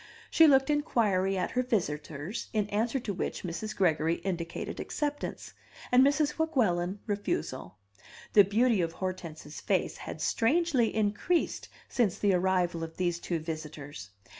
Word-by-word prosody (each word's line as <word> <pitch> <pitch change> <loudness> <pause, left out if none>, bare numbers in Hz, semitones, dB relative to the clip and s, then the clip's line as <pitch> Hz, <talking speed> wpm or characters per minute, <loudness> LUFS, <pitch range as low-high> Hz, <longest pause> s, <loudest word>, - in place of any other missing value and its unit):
She 325 - +7
looked 270 0 +5
inquiry 205 -10 +1
at 180 - -1
her 250 - +1
visitors, 165 - -3
in 210 -2 +1
answer 230 +6 0
to 215 -4 -4
which 185 - -4
Mrs. 180 +5 -4
Gregory 165 -4 +2
indicated 170 -3 -4
acceptance, 290 -1 -4 0.4
and 250 +1 +7
Mrs. 290 +2 +2
Weguelin 205 - +1
refusal. 165 - -3 0.6
The 205 - +9
beauty 220 +1 +2
of 165 -1 -1
Hortense's 170 -5 -6
face - - 0
had - - -7
strangely 260 -2 +2
increased 215 +11 0 0.2
since 215 -7 +1
the 200 -2 +2
arrival 180 -2 +1
of 160 0 -7
these 175 -2 0
two 170 0 -2
visitors. 155 - -7
195 Hz, 140 wpm, -29 LUFS, 170-240 Hz, 0.6 s, The